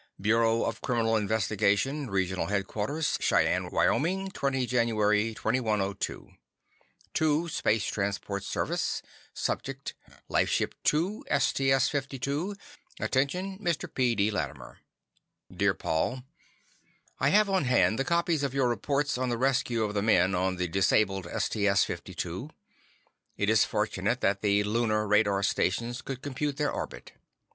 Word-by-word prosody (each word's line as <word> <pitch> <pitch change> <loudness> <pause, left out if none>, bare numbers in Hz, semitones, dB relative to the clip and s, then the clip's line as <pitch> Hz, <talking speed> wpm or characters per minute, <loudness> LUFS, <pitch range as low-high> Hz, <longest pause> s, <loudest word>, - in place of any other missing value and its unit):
Bureau 115 +3 +2
of 115 0 -3
Criminal 115 -3 +1
Investigation 110 +6 +1
Regional 95 -1 -1
Headquarters 105 +9 -1
Cheyenne, - - +2
Wyoming 190 +5 +1
20 135 -6 -1
January 110 -2 +1
2102 105 -5 -1 0.8
To: 155 +2 +1
Space 110 - 0
Transport 100 0 -2
Service - - -2 0.3
Subject: 135 0 -3 0.3
Lifeship - - +1
2, 175 +8 +1
STS 135 -1 +2
52 140 +6 -2 0.4
Attention 180 +9 -1
Mr. 175 -3 -1
P. 125 -3 +2
D. 105 +1 +2
Latimer 75 - -5 0.8
Dear - - +2
Paul, 125 +11 -1 1.0
I 135 - +3
have 210 +6 +4
on 190 -6 +1
hand 120 -2 +3
the - - +2
copies 170 -1 +1
of 140 -2 -2
your 130 -3 +2
reports 140 +2 -1
on 130 -1 0
the 120 - -1
rescue 125 -3 +1
of 105 -1 -2
the 100 - 0
men 95 -3 +3
on 95 +1 0
the 90 0 -1
disabled 95 +1 +1
STS 100 +1 +1
52. - - -5 0.9
It - - +1
is - - +5
fortunate - - -1
that 100 0 +1
the 105 -1 +2
Lunar 110 0 0
radar 100 -1 +3
stations 115 +6 0
could 135 0 -6
compute 145 0 -3
their 150 -1 0
orbit. - - -6
115 Hz, 130 wpm, -28 LUFS, 105-140 Hz, 1.0 s, is